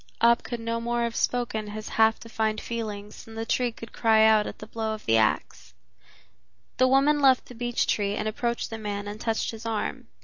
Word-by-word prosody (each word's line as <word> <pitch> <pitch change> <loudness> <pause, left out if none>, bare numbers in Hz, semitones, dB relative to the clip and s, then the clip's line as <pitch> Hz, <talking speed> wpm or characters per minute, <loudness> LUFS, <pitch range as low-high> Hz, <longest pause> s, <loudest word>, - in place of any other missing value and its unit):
Ab 235 +1 +5
could 240 -1 -5
no 230 0 -2
more 235 0 0
have 235 0 -2
spoken 235 -3 -1
his 215 +1 -6
half 220 0 +3
defined 220 -1 -2
feelings 210 -3 -6
than 225 - -12
the 225 0 -3
tree 245 +1 +1
could 230 0 -11
cry 220 -2 +4
out 215 -1 +5
at - - -7
the - - -9
blow 220 0 -3
of 215 - -13
the 115 - +3
ax. 105 - 0 1.0
The 255 - +5
woman 275 +3 +4
left 265 -2 +5
the - - -12
beech 240 0 -1
tree 205 -1 0
and 215 - -2
approached 235 +2 -2
the 225 - -5
man 205 -1 -4
and 210 +2 -7
touched 225 -1 -1
his 225 0 -9
arm. 215 - -3
225 Hz, 210 wpm, -26 LUFS, 215-235 Hz, 1.0 s, Ab